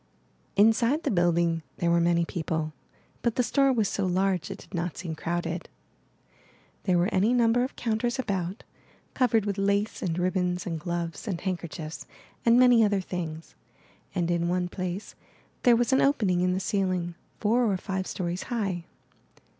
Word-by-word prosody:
Inside 230 Hz, +8 st, +4 dB
the -, -, 0 dB
building 170 Hz, -2 st, +2 dB, 0.2 s
there 170 Hz, -1 st, +1 dB
were 170 Hz, 0 st, +4 dB
many 170 Hz, 0 st, +3 dB
people, 160 Hz, -3 st, -3 dB, 0.5 s
but 235 Hz, -2 st, 0 dB
the 250 Hz, -, +2 dB
store 275 Hz, +3 st, +3 dB
was 225 Hz, -5 st, +2 dB
so 200 Hz, -, -2 dB
large 185 Hz, -2 st, +1 dB
it -, -, -5 dB
did -, -, -16 dB
not 170 Hz, -2 st, -2 dB
seem 170 Hz, -3 st, -4 dB
crowded. 170 Hz, +1 st, -3 dB, 1.2 s
There 185 Hz, -2 st, +3 dB
were 175 Hz, +5 st, +1 dB
any 205 Hz, +6 st, +3 dB
number 240 Hz, 0 st, +3 dB
of 255 Hz, -, -4 dB
counters 235 Hz, +1 st, -1 dB
about, 195 Hz, -5 st, -2 dB, 0.5 s
covered 230 Hz, -5 st, +2 dB
with 200 Hz, -1 st, -2 dB
lace, 200 Hz, +2 st, 0 dB
and 170 Hz, -2 st, -1 dB
ribbons, 180 Hz, 0 st, 0 dB
and 165 Hz, -3 st, -3 dB
gloves, 170 Hz, +1 st, -4 dB
and 185 Hz, -5 st, -2 dB
handkerchiefs, 170 Hz, -4 st, -5 dB, 0.4 s
and 235 Hz, 0 st, +5 dB
many 245 Hz, -2 st, +6 dB
other 205 Hz, -2 st, +2 dB
things; 165 Hz, -4 st, -5 dB, 0.6 s
and 175 Hz, -2 st, 0 dB
in 170 Hz, 0 st, +1 dB
one 180 Hz, 0 st, 0 dB
place 185 Hz, +2 st, -4 dB, 0.5 s
there 245 Hz, -2 st, +6 dB
was 240 Hz, +2 st, +1 dB
an 265 Hz, -, +4 dB
opening 205 Hz, -11 st, +2 dB
in 180 Hz, 0 st, +2 dB
the 185 Hz, -, 0 dB
ceiling, 185 Hz, -3 st, -1 dB, 0.3 s
four 225 Hz, +1 st, +2 dB
or 190 Hz, -, 0 dB
five 190 Hz, 0 st, -3 dB
stories 175 Hz, -1 st, -3 dB
high. 195 Hz, -8 st, -2 dB
185 Hz, 165 wpm, -27 LUFS, 175-220 Hz, 1.2 s, many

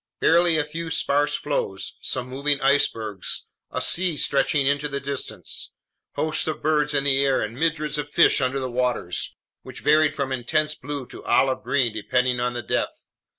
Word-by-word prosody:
Barely 170 Hz, 0 st, +4 dB
a 155 Hz, -, +2 dB
few 165 Hz, +2 st, -6 dB
sparse 145 Hz, -1 st, +1 dB
floes, 100 Hz, -9 st, -3 dB
some 125 Hz, -1 st, -2 dB
moving 140 Hz, +2 st, +1 dB
icebergs; 115 Hz, -7 st, 0 dB, 0.2 s
a -, -, -3 dB
sea 175 Hz, -3 st, +2 dB
stretching 140 Hz, +1 st, +2 dB
into 140 Hz, +1 st, +1 dB
the 140 Hz, -1 st, -4 dB
distance; 140 Hz, -1 st, -5 dB, 0.4 s
hosts 155 Hz, 0 st, 0 dB
of 155 Hz, -, -3 dB
birds 150 Hz, -1 st, +2 dB
in 140 Hz, -, +3 dB
the 140 Hz, -1 st, +4 dB
air 135 Hz, -1 st, +2 dB
and 110 Hz, +1 st, -3 dB
myriads 150 Hz, +1 st, -1 dB
of 145 Hz, 0 st, -4 dB
fish 145 Hz, -, +4 dB
under 130 Hz, +1 st, 0 dB
the 130 Hz, -, -3 dB
waters, 125 Hz, -8 st, -2 dB, 0.3 s
which -, -, -11 dB
varied 155 Hz, -1 st, +3 dB
from 140 Hz, -3 st, -2 dB
intense 150 Hz, +5 st, 0 dB
blue 145 Hz, -3 st, -6 dB
to -, -, -12 dB
olive 130 Hz, -1 st, +2 dB
green 125 Hz, -5 st, +1 dB
depending 125 Hz, +3 st, 0 dB
on 125 Hz, 0 st, -1 dB
the 120 Hz, -1 st, -4 dB
depth. -, -, -2 dB
140 Hz, 175 wpm, -24 LUFS, 125-150 Hz, 0.4 s, Barely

